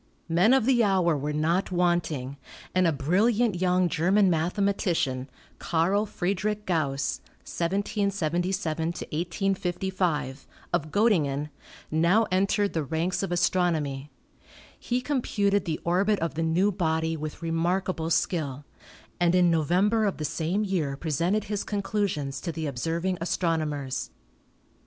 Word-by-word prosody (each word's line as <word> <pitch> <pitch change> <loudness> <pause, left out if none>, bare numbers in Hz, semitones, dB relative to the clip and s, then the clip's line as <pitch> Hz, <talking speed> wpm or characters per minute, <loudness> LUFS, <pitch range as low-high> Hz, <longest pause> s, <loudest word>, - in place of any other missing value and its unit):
Men 175 +7 +4
of 265 -4 +4
the 245 -2 +4
hour 185 -5 +3
were 145 +1 -2
not 165 +6 0
wanting, 175 -7 0 0.4
and 185 -1 +3
a - - +3
brilliant 195 - +1
young 180 0 +3
German 185 +4 +3
mathematician, 165 -6 0 0.3
Carl 190 +6 +1
Friedrich 205 +3 -2
Gauss 140 -6 -1 0.2
(1777 185 -3 -1
1855), 175 -3 -2 0.3
of 155 -3 0
Gottingen, 150 -9 +1 0.4
now 170 +8 +3
entered 200 +2 +1
the 160 - 0
ranks 160 +6 -1
of 195 - -3
astronomy. 165 -6 0 0.7
He 245 +1 -1
com 270 0 -1
puted 200 -3 +1
the 160 -2 -2
orbit 195 +5 +2
of 165 0 -2
the 165 - -3
new 170 +5 +2
body 160 -3 0
with 155 +1 -6
remarkable 165 +1 -1
skill, 150 -5 -1 0.5
and 175 0 +3
in 180 -1 +4
November 185 +8 +2
of 200 - -1
the 155 - -3
same 175 +7 -1
year 165 -9 -1
presented 170 +7 0
his 205 -1 -3
conclusions 195 -9 -2
to 170 - -3
the 160 -1 -4
observing 165 +7 -2
astronomers. 155 -6 -1
175 Hz, 125 wpm, -27 LUFS, 160-195 Hz, 0.7 s, Men